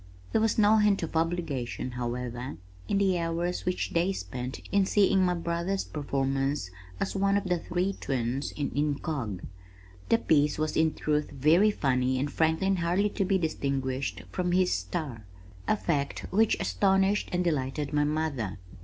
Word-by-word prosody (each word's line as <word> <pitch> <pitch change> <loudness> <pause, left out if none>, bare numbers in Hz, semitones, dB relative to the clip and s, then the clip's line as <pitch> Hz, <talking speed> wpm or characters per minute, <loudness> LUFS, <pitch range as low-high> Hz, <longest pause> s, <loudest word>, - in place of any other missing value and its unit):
There - - +2
was 225 -1 +2
no 215 0 +5
hint 210 -3 +3
of 165 - -5
obligation, 160 -7 -1
however, 120 -3 -4 0.3
in 200 - +1
the 190 -3 +2
hours 170 +1 -2
which 180 - -1
they 170 +3 +2
spent 125 - -5
in 200 -1 +3
seeing 195 -2 +4
my 180 -1 +2
brother's 170 +3 -1
performance 135 -5 -1 0.3
as - - -2
one 200 +1 +2
of 200 - -1
the 180 -3 0
"Three 180 +3 -1
Twins" 130 -3 -2
in 145 - -3
Incog. 145 - -2 0.7
The 230 - +5
piece 150 -8 +2
was 155 0 -1
in 160 -1 +2
truth 150 -1 0
very 155 +9 +4
funny 130 -8 +1
and 140 +3 -1
Franklin 165 +4 +2
hardly 180 +4 +1
to - - 0
be 190 +1 +2
distinguished 140 -5 -2
from 180 -1 -1
his 185 0 +3
"Star," 115 - -4 0.4
a - - +3
fact 145 -7 -1
which 220 +3 +3
astonished 190 - +2
and 180 0 +1
delighted 145 -3 -1
my 145 0 +3
mother. 145 -10 -1
160 Hz, 160 wpm, -28 LUFS, 135-185 Hz, 0.7 s, no